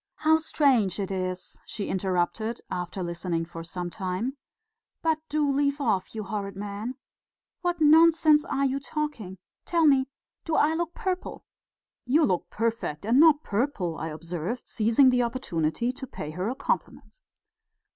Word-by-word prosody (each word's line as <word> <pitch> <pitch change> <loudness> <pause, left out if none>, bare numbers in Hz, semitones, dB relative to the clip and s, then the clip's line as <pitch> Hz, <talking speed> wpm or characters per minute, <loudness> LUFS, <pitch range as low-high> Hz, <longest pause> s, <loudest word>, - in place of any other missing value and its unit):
"How 315 +1 +3
strange 265 - +2
it 195 -1 -2
is," 185 -1 -4
she 205 - -5
interrupted, 190 +4 -1
after 180 +1 -3
listening 170 -1 -2
for 165 0 -8
some 175 +1 -5
time. 190 +9 -3 0.7
"But 320 -1 +2
do 300 -1 +1
leave 280 +1 +1
off, 220 -7 0
you 215 - -3
horrid 200 0 -4
man. 205 +5 -5 0.7
What 350 -1 -1
nonsense 315 0 +6
you 275 0 +1
are - - -3
talking.... 275 - -4 0.3
Tell 335 -2 +2
me, 270 -3 +4 0.4
do 325 - -1
I 310 +1 +4
look 340 +1 -2
purple?" 370 -1 -4 0.6
"You 300 +5 +4
look 180 -2 -1
perfect, 225 -8 -2
and 235 +5 +4
not 310 -1 +6
purple!" 205 - -1
I 160 - -3
observed, 170 - -5
seizing 230 +4 +4
the 250 0 +3
opportunity 235 -3 -1
to 265 +1 -8
pay 150 -9 -6
her 180 +6 -2
a 255 - -3
compliment. - - -3
230 Hz, 150 wpm, -27 LUFS, 185-295 Hz, 0.7 s, nonsense